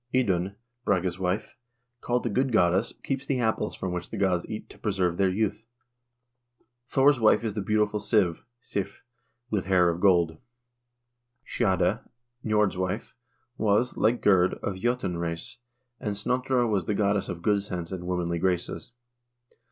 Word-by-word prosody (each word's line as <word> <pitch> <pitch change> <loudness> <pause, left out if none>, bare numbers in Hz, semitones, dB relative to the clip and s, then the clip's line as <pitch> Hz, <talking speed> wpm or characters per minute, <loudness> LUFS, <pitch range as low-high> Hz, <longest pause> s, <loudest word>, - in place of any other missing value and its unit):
Idun, 100 -6 +1 0.3
Brage's 95 -3 0
wife, 95 +3 -2 0.5
called 120 0 0
the 120 - -1
good 130 +4 +1
goddess, 95 -1 +3
keeps 135 -1 -2
the 135 -3 0
apples 110 -2 0
from 95 - -4
which 90 -1 -4
the 110 - -6
gods 95 -3 +1
eat 110 - -6
to - - -15
preserve 95 -5 0
their 95 -1 +3
youth. 105 +3 -1 1.2
Thor's 135 +1 +4
wife 110 0 +4
is 110 -3 -2
the 105 - -2
beautiful 105 +1 +1
Siv 100 -5 +2 0.2
(Sif), 100 -5 -4 0.5
with 100 -4 0
hair 90 -2 +4
of 85 +1 -3
gold. 85 -5 +3 1.1
Skade, 95 0 +1 0.4
Nj0rd's 105 -3 +2
wife, 95 -1 -3 0.5
was, 110 +4 +2
like 115 +2 +1
Gerd, 95 -3 +4
of 100 - -1
J0tun 95 -3 -1
race, 85 +5 -4 0.4
and 105 -2 -3
Snotra 125 +3 +1
was 100 -4 0
the 105 - 0
goddess 100 -1 +1
of 85 -1 -6
good 105 -2 +3
sense 90 -4 -5
and 90 -2 -5
womanly 85 -2 -1
graces. 90 +6 -2
100 Hz, 150 wpm, -27 LUFS, 90-110 Hz, 1.2 s, Thor's